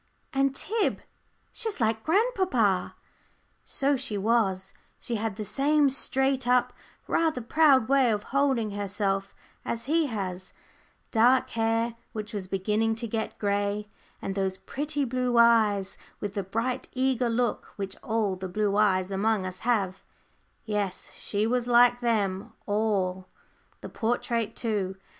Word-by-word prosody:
And, 275 0 +2
Tib, 440 +8 0 0.5
she's 445 -7 -3
like 220 -1 +1
grandpapa." 360 - +1 0.7
So 280 +1 +1
she 260 -5 -3
was. 195 -3 +1 0.3
She 235 - -2
had 220 -1 -2
the 215 0 -5
same 280 +6 +3
straight 265 -1 +1
up, 250 0 +3 0.3
rather 320 -5 +1
proud 265 -1 +4
way 270 -2 +4
of 210 -2 0
holding 265 -6 +2
herself 200 -1 -2 0.3
as 230 - -3
he 315 +2 +2
has, 190 -6 -5 0.6
dark 245 +3 +4
hair, 225 +1 0 0.2
which 210 -1 -6
was 200 -3 -4
beginning 210 +4 0
to 230 +1 -4
get 220 0 -3
grey, 205 0 -1 0.3
and 195 - -2
those 190 -1 -1
pretty 290 +3 -3
blue 250 -1 0
eyes 215 -4 +4 0.2
with 205 -1 -4
the 200 - -1
bright 225 +7 -3
eager 255 -2 +1
look 235 0 -1
which 195 -1 -4
all 215 -4 -1
the 185 0 -6
blue 205 +1 0
eyes 190 -3 +2
among 200 0 +1
us 185 0 -6
have 200 -6 0 0.6
yes, 205 -3 -3
she 205 +1 -2
was 245 +1 0
like 245 0 +5
them 205 -5 0
all 195 -3 0 0.5
the - - -6
portrait, 230 -1 -1
too. 205 -5 -1
225 Hz, 140 wpm, -27 LUFS, 200-250 Hz, 0.7 s, like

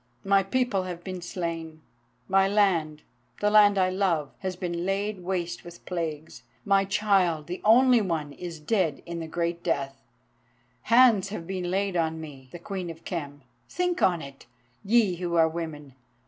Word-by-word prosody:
My 195 0 +4
people 200 -1 0
have 175 -1 -6
been 185 -2 -6
slain, 165 -3 -5 0.4
my 195 0 +4
land—the 165 - -1
land 205 -1 +6
I 185 -1 +3
love—has 185 -1 -1
been 175 -1 -3
laid 200 +2 -1
waste 175 -1 -3
with 175 0 -13
plagues; 160 -7 -5 0.2
my 195 -1 +3
child, 195 -6 +1
the 180 +3 -6
only 245 +2 +6
one, 160 -7 -2
is 170 -1 -7
dead 160 -2 0
in 170 0 -5
the 165 - -5
great 170 +1 -2
death; 140 -5 -2 0.9
hands 230 -5 +5
have 195 -5 -6
been 185 -1 -3
laid 195 0 -1
on 160 -1 0
me, 140 -5 -10
the - - -7
Queen 185 0 -5
of 165 0 -10
Khem. 145 -5 -5 0.3
Think 360 -1 -1
on 175 -3 +2
it, 140 -2 -12 0.4
ye 210 -4 +3
who 175 -1 -2
are 165 -1 +5
women! 160 -4 -6
175 Hz, 160 wpm, -27 LUFS, 160-195 Hz, 0.9 s, land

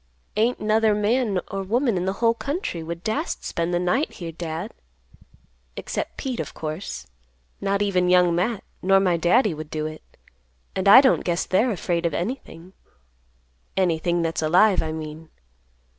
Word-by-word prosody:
"Ain't 230 +4 +1
'nother 215 0 +2
man 210 -1 +1
or 195 - -2
woman 235 +4 +1
in 180 0 -1
the 190 - 0
whole 230 +3 +2
country 280 - -4
would 170 +1 -6
dast 285 +10 -2
spend 170 +1 -2
the 175 - +1
night 180 - 0
here, 170 -2 -6
Dad; 165 +5 -5 1.0
except - - -4
Pete, 260 -4 -4
of - - -5
course. 155 - -5 0.6
Not 200 +1 +1
even 180 -3 +1
Young 180 -1 +5
Matt, 190 +5 -1 0.2
nor 195 +1 +4
my 185 -3 +2
Daddy 180 +5 +3
would 155 0 -8
do 155 -1 -3
it; 155 0 -6 0.7
and 190 +1 -1
I 240 +7 +10
don't 265 - +3
guess 175 0 -1
they're 215 +7 +2
afraid 175 -5 -1
of 165 - -3
anything—anything 160 - -4
that's 165 0 -1
alive, 180 +5 +4
I 160 - -3
mean. 155 0 -7
180 Hz, 160 wpm, -24 LUFS, 165-215 Hz, 1.0 s, I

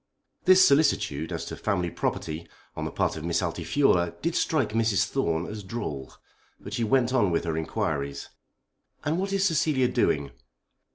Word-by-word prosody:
This 185 0 +7
solicitude 140 - +2
as - - -4
to - - -6
"family 90 -5 -1
property" 80 +1 -3 0.3
on - - -4
the - - -4
part - - 0
of 80 - -6
Miss 85 +1 0
Altifiorla 85 - +1
did 170 +1 0
strike 155 -4 +1
Mrs. 110 -2 +2
Thorne 85 -9 -1
as 105 +1 -6
droll. 95 - -5 0.5
But - - -9
she 120 - -1
went 125 +2 +2
on 110 -7 +3
with 85 -1 0
her 80 -2 -2
inquiries. 70 -3 -3 0.8
"And 155 +4 0
what 195 +1 -2
is 195 0 +1
Cecilia 150 -6 +2
doing?" 70 - 0
105 Hz, 165 wpm, -26 LUFS, -, 0.8 s, This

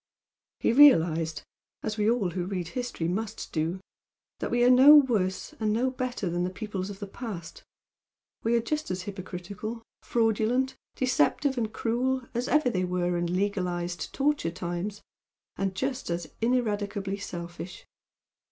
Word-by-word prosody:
He - - +2
realised, 165 - +5 0.4
as 215 -1 -2
we 210 0 +2
all 220 -7 +1
who 180 0 -3
read 180 -3 -3
history, 245 -7 -3
must 215 +5 -3
do, 165 +3 -1 0.6
that - - -2
we 240 0 +2
are 245 - +6
no 265 +4 +9
worse 220 -10 +2
and 215 -1 +1
no 245 +4 +1
better 255 -6 -3
than 175 +1 -1
the 180 - 0
peoples 195 -1 -4
of 200 - -7
the 205 - -5
past, 195 -5 -7 0.8
we 230 +1 +2
are 235 - +3
just 305 +5 -2
as 185 0 -3
hypocritical, 200 +4 -6 0.2
fraudulent, 235 +3 +1 0.2
deceptive 260 - +2
and 225 -3 -1
cruel 250 +4 0
as 245 +2 -1
ever 305 -3 +3
they 185 -3 0
were 180 -1 0
in 175 +1 -1
legalised 180 -3 -1
torture 285 - +1
times, 175 +4 -4 0.5
and 195 -1 -2
just 265 +2 -2
as 170 0 -2 0.2
ineradicably 205 -5 0
selfish. 175 -1 -7
205 Hz, 150 wpm, -28 LUFS, 180-245 Hz, 0.8 s, no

